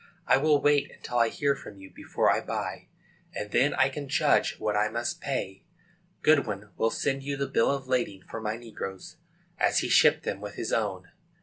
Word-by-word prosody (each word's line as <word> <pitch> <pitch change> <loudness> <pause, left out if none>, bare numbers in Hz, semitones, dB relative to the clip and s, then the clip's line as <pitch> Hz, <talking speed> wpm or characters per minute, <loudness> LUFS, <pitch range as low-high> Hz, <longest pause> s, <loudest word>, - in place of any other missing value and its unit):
I - - +5
will 150 +1 +3
wait 145 0 +3
until 120 -1 -4
I 115 -1 +4
hear 140 +3 0
from 105 -6 -11
you 95 0 -12
before - - +1
I - - 0
buy, - - -4 0.5
and 105 0 -5
then 140 +7 +3
I 135 - +4
can 140 0 -7
judge - - +2
what 105 -1 -1
I 105 +1 +2
must 120 +2 -3
pay. 95 -8 -4 0.6
Goodwin 105 -10 +2
will 115 - +1
send 135 +3 -1
you 140 +1 -3
the 140 - -1
bill 115 - +2
of 140 -1 -2
lading 120 -7 -1
for 115 - -6
my 110 0 -2
negroes, 105 -5 -8 0.4
as - - +2
he - - -2
shipped - - +5
them - - -3
with 105 -1 -7
his 115 - -3
own. 95 -5 -2
115 Hz, 200 wpm, -28 LUFS, 105-140 Hz, 0.6 s, I